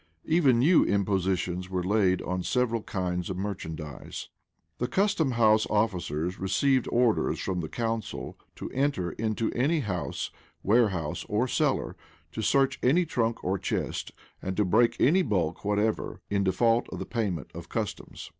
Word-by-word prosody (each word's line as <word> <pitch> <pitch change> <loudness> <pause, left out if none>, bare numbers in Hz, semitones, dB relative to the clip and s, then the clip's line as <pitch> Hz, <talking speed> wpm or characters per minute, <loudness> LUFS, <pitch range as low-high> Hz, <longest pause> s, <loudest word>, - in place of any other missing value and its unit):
Even 150 -7 +4
new 155 +8 +5
impositions 95 -2 0
were 90 -1 -1
laid 95 -1 +2
on 90 0 -2
several 115 +2 0
kinds 90 -3 -3
of 95 - -3
merchandise.[] 80 -7 -6 0.5
The 125 - 0
custom 190 -8 +1
house 110 -2 +4
officers 90 -5 -1
received 130 +7 +2
orders 120 -2 +2
from 95 -2 -2
the 80 -2 -4
council 115 -2 -3 0.2
to - - -7
enter 135 - 0
into 110 +3 -1
any 150 +6 +1
house, 90 -8 -3 0.3
warehouse, 95 -8 +1
or 110 +5 +1
cellar; - - 0 0.4
to 110 - -4
search 135 +4 +2
any 165 +8 +3
trunk 115 -7 -1
or 95 +1 0
chest; - - -3 0.3
and 95 0 -4
to 105 - +3
break 115 +6 +3
any 180 +8 +5
bulk 90 - -1
whatever; 105 +2 0
in 100 -1 +2
default 115 +5 +2
of - - -6
the - - -4
payment 95 - -3
of - - -9
customs. - - -4
105 Hz, 150 wpm, -28 LUFS, 90-120 Hz, 0.5 s, new